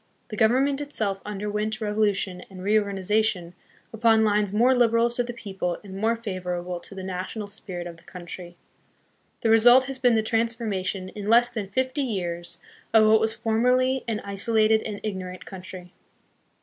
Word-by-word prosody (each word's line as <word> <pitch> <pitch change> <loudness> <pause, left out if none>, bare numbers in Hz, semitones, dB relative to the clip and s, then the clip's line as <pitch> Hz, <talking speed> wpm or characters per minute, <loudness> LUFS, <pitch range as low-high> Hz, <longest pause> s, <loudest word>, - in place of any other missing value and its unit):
The 215 - -5
government 265 +6 +2
itself 210 -9 -1
underwent 210 +1 -3
revolution 210 -4 0
and 185 -1 -10
reorgani 200 -1 +1
zation 200 -3 0 0.4
upon 225 0 +4
lines 210 -1 +1
more 240 +5 +4
liberal 235 -1 +3
to 240 - 0
the 240 0 -3
people 190 -7 -4
and 195 -2 -10
more 220 +4 +1
favorable 180 -5 -4
to 195 - -13
the 190 - -6
national 185 +3 -4
spirit 195 -4 -7
of 170 -1 -8
the 165 - -19
country. 175 -1 -9 0.8
The 225 - +2
result 240 +3 +7
has 270 0 -6
been 245 -1 +4
the 220 - +2
transformation, 220 -5 -1
in 205 +1 -6
less 240 +1 +5
than 215 -5 -4
fifty 260 +6 -1
years, 175 -8 -3 0.4
of 220 -1 +7
what 220 0 +5
was 220 0 0
formerly 250 +4 +1
an 220 -2 -2
isolated 215 +2 +2
and 210 -2 -5
ignorant 185 -3 -5
country. 185 -1 -10
215 Hz, 160 wpm, -25 LUFS, 190-230 Hz, 0.8 s, result